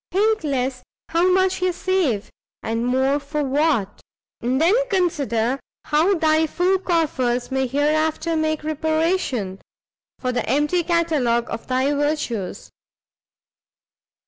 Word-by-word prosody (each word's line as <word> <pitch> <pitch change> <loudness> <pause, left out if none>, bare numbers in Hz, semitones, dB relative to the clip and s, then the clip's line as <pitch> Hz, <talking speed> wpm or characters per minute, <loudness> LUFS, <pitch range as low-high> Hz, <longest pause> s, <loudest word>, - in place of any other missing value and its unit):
think 430 +1 +2
less 260 -3 -1 0.3
how 340 +3 +3
much 375 0 +2
ye 365 0 +2
save, 345 - -1 0.3
and 230 +2 -1
more 265 +3 +2
for 290 +1 -3
what; 275 -7 0 0.4
and 250 +3 0
then 335 +5 +4 0.2
consider 280 - 0 0.3
how 315 +6 +3
thy 315 -1 +2
full 365 +4 +1
coffers 280 -9 0
may 265 0 0
hereafter 310 +4 0
make 310 -1 -1
reparation, 315 - -1 0.6
for 255 - -2
the 245 - -2
empty 295 +5 +2
catalogue 310 -9 +1
of - - -6
thy 260 +3 +1
virtues." 290 - -2
300 Hz, 120 wpm, -22 LUFS, 255-335 Hz, 0.6 s, then